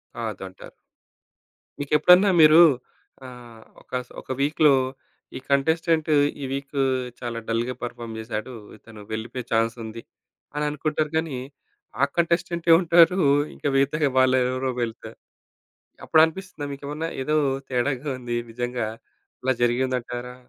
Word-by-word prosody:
కాదు 110 -4 -5
అంటారు. 95 0 -13 1.1
మీకెప్పుడన్నా 180 +7 +5
మీరు 155 +1 +8 0.7
ఆహ్, 120 -3 -12 0.2
ఒక - - -27 0.2
స్ - - -32
ఒక - - -28
వీక్‌‌లో 150 0 +4 0.6
ఈ - - -6
కంటెస్టెంటు 160 +2 +2 0.3
ఈ - - -4
వీకూ 140 0 -3 0.4
చాలా 120 -2 -4
డల్‌గా 115 +2 -1
పెర్ఫార్మ్ 115 -2 -6
చేసాడు. 110 +2 -5 0.2
ఇతను 110 -1 -14
వెళ్ళిపోయే 120 +3 -5
చాన్స్ 115 +1 +1
ఉంది 110 +1 -8 0.5
అని 150 0 -1
అనుకుంటారు 150 +1 -2
గానీ, 160 -5 -2 0.6
ఆ - - +5
కంటెస్టెంట్టే 170 0 +1
ఉంటారు. 170 +1 +5 0.4
ఇంకా - - -4
మిగతా 145 +2 +2
వాళ్ళు 130 0 +4
ఎవరో 130 0 -2
వెళ్తారు. 115 0 -7 0.9
అప్పుడు 160 - +5
అనిపిస్తుందా 165 -2 -7
మీకేమన్నా 145 +3 -5 0.2
ఏదో 150 +3 0 0.3
తేడాగా 130 +2 -1
ఉంది 120 -1 -4
నిజంగా 120 0 -3 0.6
ఇలా 130 +1 +2
జరిగింది 130 +2 +1
అంటారా? 125 +1 -7
130 Hz, 125 wpm, -24 LUFS, 120-155 Hz, 1.1 s, మీరు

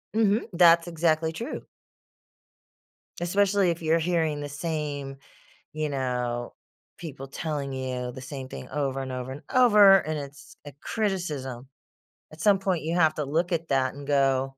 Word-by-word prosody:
Mhm, 220 0 +2
that's 170 -1 +6
exactly 160 -1 +1
true. 230 +9 -6 1.6
Especially 195 +1 +2
if 170 0 -2
you're 160 +1 +2
hearing 160 -3 0
the 145 - -5
same, 145 -3 -4 0.6
you 155 -1 -2
know, 125 -3 -2 0.4
people 140 -5 -8
telling 140 -1 -4
you 125 -1 -3
the 130 - -9
same 135 0 -7
thing 130 - -9
over 135 -1 -2
and 130 - -5
over 130 0 -5
and 145 - -8
over, 210 -6 +7
and 155 -3 -3
it's 140 0 -10
a 145 - -8
criticism. 150 - -3 0.7
At 155 - -11
some 200 +1 +5
point 185 -4 -1
you 165 +2 -1
have 160 -3 +4
to 150 - -2
look 165 +6 0
at 165 -1 -1
that 130 -1 +1
and 140 0 -10
go 135 -2 +3
150 Hz, 155 wpm, -26 LUFS, 135-170 Hz, 1.6 s, over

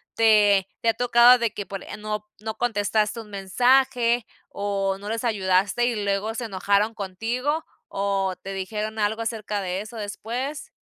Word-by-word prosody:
¿te 205 -3 +5
te 230 - +2
ha - - +3
tocado 245 +1 +6
de 235 -2 0 0.2
por 195 -2 -6
eh, - - -8
no 210 0 -4
no 220 0 -5
contestaste 215 -1 0
un 220 -2 -10
mensaje 240 +4 +2 0.2
o 195 -1 -1
no 205 +1 -7
les 225 +2 -2
ayudaste 200 +1 +2
y 230 -4 -1
luego 200 +2 -1
se 235 +1 -4
enojaron 200 +2 +1
contigo, 235 - -2 0.3
o 195 -1 0
te 195 0 -6
dijeron 210 +3 -4
algo 220 +1 0
acerca 215 -2 -3
de 185 +1 -2
eso 220 +2 -9
después? 240 +8 -5
215 Hz, 160 wpm, -24 LUFS, 200-235 Hz, 0.3 s, tocado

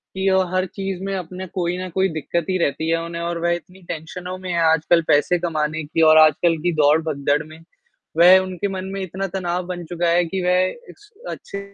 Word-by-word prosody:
कि 190 0 +1
ओ, 190 0 +4
हर 185 0 +1
चीज़ 195 -1 -5
में 195 0 -2
अपने 185 +1 -6
कोई 180 -1 -1
ना 185 0 -5
कोई 190 +2 +1
दिक्कत 170 +3 -2
ही 185 - +1
रहती 160 0 -1
है 165 0 +1
उन्हें 170 0 -6
और 170 0 -2
वह 170 - +2
इतनी 180 +2 -12
टेंशनों 180 +3 -6
में 185 -1 -6
है 170 - 0
आजकल 165 +2 +3
पैसे 160 +4 +3
कमाने 155 -2 -2
की 155 +2 -2
और 155 - +6
आजकल 155 +2 +5
की 175 +2 +1
दौड़, 155 0 +4
भगदड़ 145 -1 0
में। 155 +1 -13 0.6
वह 180 +2 +8
उनके 185 +1 -3
मन 185 0 -4
में 195 - -4
इतना 190 +1 -4
तनाव 180 -1 -2
बन 180 -1 -5
चुका 175 +1 -2
है 175 +1 +3
कि 185 +3 -3
वह 180 +1 +3 0.3
इस 420 +1 -21 0.2
अच्छे 200 - -7
175 Hz, 220 wpm, -21 LUFS, 160-185 Hz, 0.6 s, वह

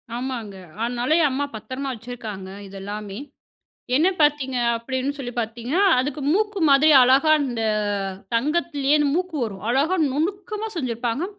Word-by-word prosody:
ஆமாங்க. 240 -5 -4 0.3
அதனால 240 +3 -1
எ - - +4
அம்மா 280 +2 -1
பத்திரமா 260 +5 -5
வச்சிருக்காங்க 220 -5 -7 0.2
இதெல்லாமே. 200 +1 -7 0.8
என்ன 320 +6 +4
பார்த்தீங்க 290 -3 +2 0.2
அப்படின்னு 260 +3 -2
சொல்லி 250 -4 -6
பார்த்தீங்கன்னா, 235 - -2 0.2
அதுக்கு 290 +3 -3
மூக்கு 415 0 0
மாதிரி 280 +3 +6
அழகா 270 +5 +5
இந்த 240 -3 -3 0.7
தங்கத்திலேயே 290 +2 +1 0.2
மூக்கு 360 -1 -2
வரும். 195 -3 -7
அழகா 285 +9 +2 0.2
நுணுக்கமா 400 - -2
செஞ்சிருப்பாங்க. 245 0 -2
260 Hz, 120 wpm, -23 LUFS, 230-305 Hz, 0.8 s, மாதிரி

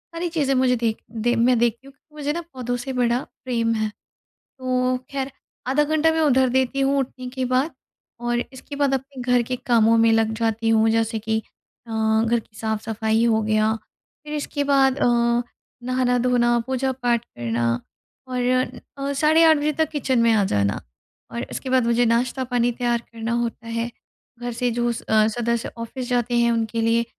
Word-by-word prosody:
सारी 345 +1 -2
चीज़ें 290 -5 0
मुझे 255 -1 +3
देख 230 -2 -1
दे 235 +1 0
मैं 240 +2 +3
देखती 240 +3 0
हूँ - - -12
क्योंकि 300 +2 -28
मुझे 295 0 -2
ना 340 - -3
पौधों 245 -1 -3
से 260 +2 -5
बड़ा 245 -1 +2 0.3
प्रेम 230 -2 0
है। 215 -1 0 0.7
तो 255 0 0 0.2
ख़ैर 275 0 -2 0.4
आधा 295 +3 +3
घंटा 315 +1 +2
मैं 320 - 0
उधर 265 -4 +4
देती 260 +2 +1
हूँ 275 +1 +2
उठने 255 -1 -4
के 260 0 -3
बाद 255 +5 +1 0.5
और 240 0 0
इसके 265 +2 -9
बाद 280 -1 +2
अपने 270 0 -5
घर 245 0 +3
के 250 +2 -3
कामों 230 -2 +4
में 225 0 +5
लग 225 0 +2
जाती 225 0 0
हूँ 225 0 +4
जैसे 225 0 +1
कि 220 +1 -1 0.5
अ, 230 - -11 0.3
घर 235 +1 +2
की 215 - -23
साफ-सफाई 220 +1 0
हो 220 -2 +3
गया 215 0 +2 0.5
फिर 300 0 -6
इसके 290 -1 -2
बाद 275 -1 +3
अ, - - +1 0.8
नहाना-धोना, 245 -1 +2
पूजा-पाठ 255 -2 0
करना 120 - -2 0.6
और 250 -1 -2 0.6
अ, 280 - -1
साढ़े 310 +3 +4
8 320 -1 +6
बजे 295 +1 0
तक 315 +1 0
किचन 265 -4 0
में 230 0 +4
आ 210 -2 +3
जाना 100 - 0 0.5
और 235 - -4
इसके 260 - -5
बाद 255 -2 +3
मुझे 235 +1 +3
नाश्ता 240 +3 +1
पानी 245 -1 +1
तैयार 240 0 0
करना 230 0 -3
होता 235 -1 -2
है 230 +1 -2 0.5
घर 245 0 -3
से 245 +1 -1
जो 240 +1 0
अ, 220 -2 +2
सदस्य 235 +1 -1
ऑफ़िस 245 +2 -5
जाते 245 -1 0
हैं 235 0 +3
उनके 230 0 -1
लिए 230 +1 +2
245 Hz, 185 wpm, -23 LUFS, 230-265 Hz, 0.8 s, 8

